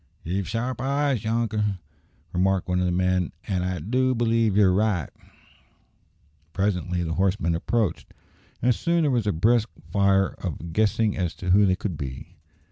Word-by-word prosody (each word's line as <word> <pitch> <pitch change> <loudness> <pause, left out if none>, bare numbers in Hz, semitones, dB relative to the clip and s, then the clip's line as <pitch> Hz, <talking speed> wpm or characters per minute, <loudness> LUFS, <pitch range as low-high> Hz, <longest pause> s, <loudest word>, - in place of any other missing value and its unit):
"Ye've 95 +3 -2
sharp 120 +2 -2
eyes, 140 -3 0
younker," 110 -3 0 0.6
remarked 95 +1 +1
one 90 0 0
of 90 - +1
the - - 0
men, 90 0 0
"an' 95 -3 0
I 90 0 -2
do 130 +9 0
b'lieve 115 -3 +2
ye're 100 -3 +5
right." 100 -5 +1 1.5
Presently 90 -3 -1
the 80 -1 -2
horsemen 95 -2 +1
approached, 95 +1 -1 0.5
and 125 0 +4
soon 170 +7 0
there 145 - +2
was 120 -4 0
a - - +3
brisk 110 +7 +2 0.2
fire 100 -1 +3
of 85 -1 -5
guessing 110 +1 +2
as 90 -2 -2
to 90 0 -3
who 100 +2 +5
they 95 - +3
could 90 -4 -4
be. 65 -2 -7
100 Hz, 160 wpm, -25 LUFS, 90-115 Hz, 1.5 s, ye're